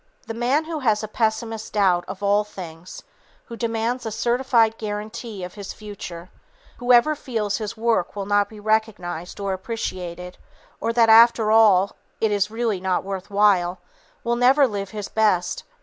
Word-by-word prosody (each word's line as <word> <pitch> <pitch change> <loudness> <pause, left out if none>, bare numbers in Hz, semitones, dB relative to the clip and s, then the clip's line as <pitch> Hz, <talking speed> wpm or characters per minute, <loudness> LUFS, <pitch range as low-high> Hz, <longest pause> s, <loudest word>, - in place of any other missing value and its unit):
The 225 - -5
man 250 +7 +1
who 320 -1 -4
has 220 -5 +1
a - - -3
pessimist's 220 0 -2
doubt 185 -4 +2
of 190 +1 -7
all 205 +1 +3
things; 175 -4 -10 0.4
who 235 - -8
demands 230 +2 -2
a 225 - -3
certified 235 0 +1
guarantee 215 0 -5
of 180 - -7
his 200 -2 -7
future; 185 -4 -9 0.5
who 245 +1 0
ever 245 +6 +6
fears 225 -8 -3
his 215 0 -5
work 225 -5 0
will 200 -1 -4
not 205 0 +2
be 215 - -12
recognized 205 -6 -2
or 200 -1 -2
appreciated; 180 -4 -5 0.4
or 230 - -1
that 230 -1 +4
after 225 -1 +6
all, 205 -4 +5 0.2
it 220 -1 +1
is 205 0 +1
really 225 -4 -2
not 185 -1 0
worth 195 -1 -6
while, 195 -3 +3 0.5
will 235 0 0
never 260 +4 +5
live 200 -3 -4
his 210 -2 -6
best. 205 -5 0
215 Hz, 165 wpm, -23 LUFS, 195-230 Hz, 0.5 s, ever